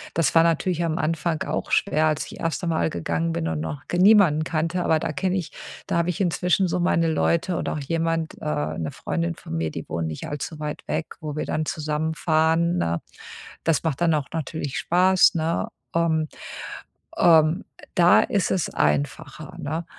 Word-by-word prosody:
das 165 Hz, -, +2 dB
war 165 Hz, -, +7 dB
natürlich 170 Hz, +1 st, +1 dB
am 165 Hz, -1 st, -1 dB
Anfang 165 Hz, 0 st, -1 dB
auch -, -, -3 dB
schwer, 155 Hz, -5 st, +2 dB
als 155 Hz, -1 st, 0 dB
ich -, -, -11 dB
erste 165 Hz, +2 st, -2 dB
Mal 85 Hz, -, +1 dB
gegangen 85 Hz, 0 st, -2 dB
bin 80 Hz, 0 st, -2 dB
und 80 Hz, -1 st, -2 dB
noch 105 Hz, -, -5 dB
ge 175 Hz, -, -1 dB
niemanden 190 Hz, -7 st, +6 dB
kannte, 165 Hz, +3 st, -1 dB
aber 160 Hz, -, +3 dB
da 155 Hz, -, -2 dB
kenne 185 Hz, +2 st, -1 dB
ich 170 Hz, -, -4 dB, 0.3 s
da -, -, -1 dB
habe 170 Hz, +1 st, +1 dB
ich 180 Hz, -, -3 dB
inzwischen 180 Hz, 0 st, +2 dB
so 180 Hz, -, -1 dB
meine 165 Hz, -2 st, +2 dB
Leute 170 Hz, +3 st, +1 dB
und -, -, -2 dB
auch 155 Hz, -, -3 dB
jemand 165 Hz, +2 st, -1 dB
äh, -, -, -7 dB, 0.3 s
'ne 80 Hz, -, -2 dB
Freundin 85 Hz, +1 st, -3 dB
von 80 Hz, -, -7 dB
mir, 80 Hz, -1 st, -1 dB
die -, -, -7 dB
wohnt 80 Hz, 0 st, -2 dB
nicht 80 Hz, -, -6 dB
allzu 145 Hz, +2 st, -5 dB
weit 150 Hz, -1 st, -4 dB
weg, 160 Hz, -, -3 dB
wo 150 Hz, -2 st, -5 dB
wir -, -, -2 dB
dann 155 Hz, -, -1 dB
zusammen 155 Hz, 0 st, -2 dB
fahren, 165 Hz, +2 st, +2 dB
ne? 85 Hz, 0 st, -1 dB, 0.6 s
Das 165 Hz, -3 st, +1 dB
macht 160 Hz, -2 st, -2 dB
dann 165 Hz, -2 st, +3 dB
auch 145 Hz, -2 st, -2 dB
natürlich 155 Hz, -3 st, -3 dB
Spaß, 185 Hz, +1 st, +4 dB
ne? 165 Hz, +1 st, 0 dB, 0.3 s
Ähm 160 Hz, -2 st, +2 dB, 0.9 s
ähm, 160 Hz, +1 st, +5 dB, 0.3 s
da 175 Hz, -1 st, +6 dB
ist 200 Hz, -3 st, 0 dB
es 185 Hz, -, 0 dB
einfacher, 75 Hz, -1 st, -1 dB
ne, 160 Hz, +4 st, -3 dB
160 Hz, 190 wpm, -24 LUFS, 150-170 Hz, 0.9 s, war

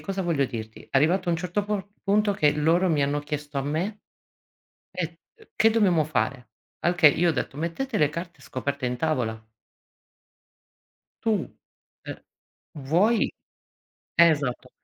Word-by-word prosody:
cosa 195 Hz, -1 st, -3 dB
voglio 160 Hz, -6 st, +1 dB
dirti, 110 Hz, -2 st, -8 dB
arrivato 175 Hz, +7 st, +2 dB
a -, -, +3 dB
un 165 Hz, -, 0 dB
certo 180 Hz, +4 st, -1 dB
por 205 Hz, -2 st, -2 dB, 0.2 s
punto 205 Hz, +1 st, +2 dB
che 150 Hz, -7 st, +3 dB
loro 165 Hz, +5 st, +2 dB
mi 155 Hz, -4 st, +2 dB
hanno 145 Hz, +1 st, 0 dB
chiesto 145 Hz, -1 st, -4 dB
a -, -, -1 dB
me 160 Hz, +9 st, -2 dB, 1.0 s
"eh, 180 Hz, -2 st, -1 dB
uhm, 170 Hz, -, -17 dB, 0.2 s
che 435 Hz, -1 st, -21 dB
che 225 Hz, -, +5 dB
dobbiamo 190 Hz, -8 st, +3 dB
fare?" 125 Hz, -4 st, -2 dB, 0.3 s
Al 175 Hz, -, +1 dB
che 175 Hz, -3 st, +6 dB
io 170 Hz, +4 st, +2 dB
ho -, -, +3 dB
detto: 135 Hz, -1 st, -3 dB
"Mettete 170 Hz, -, -3 dB
le 150 Hz, -, +4 dB
carte 170 Hz, 0 st, -7 dB
scoperte 135 Hz, 0 st, -3 dB
in 125 Hz, 0 st, -2 dB
tavola." 125 Hz, -6 st, -1 dB, 1.8 s
Tu, 225 Hz, -, +1 dB, 0.8 s
eh, -, -, -5 dB, 0.6 s
vuoi 175 Hz, -, +2 dB, 0.9 s
esatto. 150 Hz, -7 st, +3 dB
160 Hz, 150 wpm, -25 LUFS, 140-185 Hz, 1.8 s, che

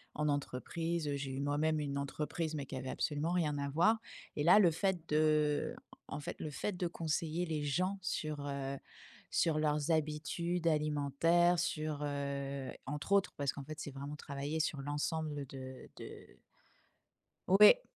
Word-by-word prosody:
en 150 Hz, 0 st, +1 dB
entreprise. 150 Hz, +3 st, -1 dB
J'ai 140 Hz, -1 st, -3 dB
eu 135 Hz, -, -3 dB
moi-même 150 Hz, +2 st, +1 dB
une 140 Hz, -1 st, -2 dB
entreprise 150 Hz, +3 st, -2 dB
mais 140 Hz, -2 st, -4 dB
qui 135 Hz, -, -6 dB
avait 130 Hz, 0 st, -4 dB
absolument 150 Hz, +2 st, -1 dB
rien 160 Hz, -5 st, +1 dB
à 140 Hz, 0 st, -1 dB
voir 175 Hz, +10 st, +4 dB, 0.4 s
et 145 Hz, -, 0 dB
là, 180 Hz, +6 st, +8 dB
le 185 Hz, -5 st, +7 dB
fait, 175 Hz, 0 st, -1 dB
de 150 Hz, -1 st, +2 dB, 0.3 s
en -, -, -5 dB
fait, 145 Hz, -, -5 dB
le 155 Hz, -, -4 dB
fait 205 Hz, +8 st, -2 dB
de 180 Hz, -, -1 dB
conseiller 165 Hz, 0 st, -1 dB
les 155 Hz, -2 st, -1 dB
gens 185 Hz, +7 st, 0 dB
sur, 155 Hz, -5 st, -2 dB
heu, 140 Hz, -1 st, -3 dB, 0.6 s
sur 160 Hz, -2 st, +3 dB
leurs 150 Hz, +1 st, +1 dB
habitudes 160 Hz, +3 st, 0 dB
alimentaires, 155 Hz, +3 st, +3 dB
sur, 155 Hz, -4 st, -1 dB
heu 140 Hz, -1 st, -3 dB, 0.2 s
entre 150 Hz, +7 st, -2 dB
autres 200 Hz, 0 st, +3 dB
parce 140 Hz, -1 st, 0 dB
qu'en 140 Hz, -, -7 dB
fait, 155 Hz, +2 st, -8 dB
c'est -, -, -4 dB
vraiment 140 Hz, +2 st, -6 dB
travailler 140 Hz, +3 st, -3 dB
sur 150 Hz, -2 st, -1 dB
l'ensemble 145 Hz, +1 st, -2 dB
de 130 Hz, 0 st, -9 dB
de -, -, -9 dB, 1.2 s
Ouais. 210 Hz, -, +8 dB
150 Hz, 160 wpm, -35 LUFS, 140-165 Hz, 1.2 s, là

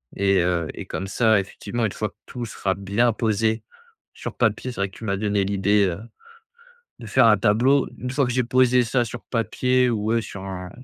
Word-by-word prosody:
et 100 Hz, -1 st, +2 dB
heu 85 Hz, -2 st, 0 dB
et -, -, -7 dB
comme 95 Hz, -, -5 dB
ça, 110 Hz, +1 st, +3 dB
effectivement 115 Hz, +4 st, -5 dB
une 105 Hz, -, -1 dB
fois 105 Hz, +2 st, -3 dB
que -, -, -30 dB
tout 120 Hz, -1 st, -6 dB
sera 100 Hz, -3 st, -2 dB
bien 100 Hz, +5 st, +1 dB
posé 110 Hz, 0 st, 0 dB, 0.5 s
sur -, -, -7 dB
papier, 125 Hz, -, 0 dB
c'est 120 Hz, -, -10 dB
vrai 100 Hz, -, 0 dB
que 95 Hz, -, -16 dB
tu -, -, -11 dB
m'as 100 Hz, -2 st, -1 dB
donné 100 Hz, -1 st, 0 dB
l'idée, 100 Hz, +1 st, +2 dB
heu, 85 Hz, -, -5 dB, 1.0 s
de 115 Hz, -, -9 dB
faire 105 Hz, -, +4 dB
un 110 Hz, -2 st, +6 dB
tableau. 120 Hz, +7 st, +3 dB
Une 125 Hz, -, -4 dB
fois 135 Hz, +2 st, +1 dB
que 125 Hz, -, -2 dB
j'ai 125 Hz, 0 st, +1 dB
posé 125 Hz, +1 st, +4 dB
ça 120 Hz, +1 st, +1 dB
sur 120 Hz, +1 st, -7 dB
papier 125 Hz, +2 st, +1 dB
ou 105 Hz, -3 st, -2 dB
ouais 115 Hz, +1 st, +1 dB
sur 100 Hz, -3 st, -8 dB
un 90 Hz, -2 st, -6 dB
110 Hz, 215 wpm, -23 LUFS, 100-120 Hz, 1.0 s, un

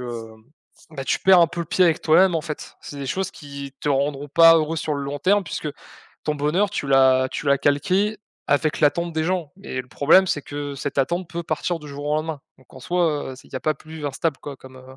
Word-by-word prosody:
heu, 120 Hz, -2 st, -6 dB, 0.6 s
bah, 140 Hz, -4 st, -6 dB
tu -, -, 0 dB
perds 190 Hz, -2 st, +6 dB
un -, -, +5 dB
peu 170 Hz, -, -5 dB
le 170 Hz, -, -4 dB
pied 185 Hz, -, +3 dB
avec 165 Hz, -3 st, +2 dB
toi-même, 175 Hz, +3 st, +5 dB
en 165 Hz, -, +1 dB
fait. 150 Hz, -1 st, -7 dB
C'est 145 Hz, -, -9 dB
des 140 Hz, -, -5 dB
choses 190 Hz, +8 st, -2 dB
qui 140 Hz, -2 st, -9 dB
te -, -, -1 dB
rendront 140 Hz, +1 st, -1 dB
pas 165 Hz, +3 st, +7 dB
heureux 160 Hz, +1 st, 0 dB
sur 155 Hz, -1 st, -2 dB
le 140 Hz, -, -3 dB
long 140 Hz, +1 st, -4 dB
terme, 200 Hz, +1 st, +3 dB
puisque 155 Hz, -, -4 dB, 0.6 s
ton 150 Hz, -, 0 dB
bonheur, 160 Hz, +8 st, +1 dB
tu 175 Hz, -, -3 dB
l'as 130 Hz, -1 st, +4 dB
tu -, -, -5 dB
l'as 140 Hz, 0 st, +4 dB
calqué 190 Hz, +10 st, +1 dB, 0.3 s
avec 150 Hz, +2 st, +1 dB
l'attente 170 Hz, +3 st, +2 dB
des 160 Hz, 0 st, -1 dB
gens. 175 Hz, -4 st, -2 dB
Et 130 Hz, -, -3 dB
le 125 Hz, -, -23 dB
problème, 155 Hz, +10 st, +4 dB
c'est 150 Hz, -, -1 dB
que 145 Hz, 0 st, -6 dB
cette 140 Hz, 0 st, -4 dB
attente 170 Hz, +6 st, 0 dB
peut 170 Hz, 0 st, -4 dB
partir 160 Hz, +2 st, -2 dB
du 150 Hz, -, -11 dB
jour 145 Hz, +1 st, -7 dB
au 150 Hz, -, +1 dB
lendemain. 155 Hz, -1 st, -3 dB, 0.2 s
Donc, 130 Hz, -, -24 dB
en -, -, -11 dB
soi, 170 Hz, -6 st, 0 dB
heu, -, -, -10 dB
c'est -, -, -16 dB
il -, -, -25 dB
y -, -, -1 dB
a -, -, -4 dB
pas 155 Hz, -1 st, 0 dB
plus 155 Hz, -1 st, -8 dB
instable, 145 Hz, +1 st, -2 dB
quoi, 140 Hz, -2 st, -8 dB
comme, 130 Hz, 0 st, -14 dB
heu, 130 Hz, +1 st, -14 dB
150 Hz, 255 wpm, -22 LUFS, 140-170 Hz, 0.6 s, pas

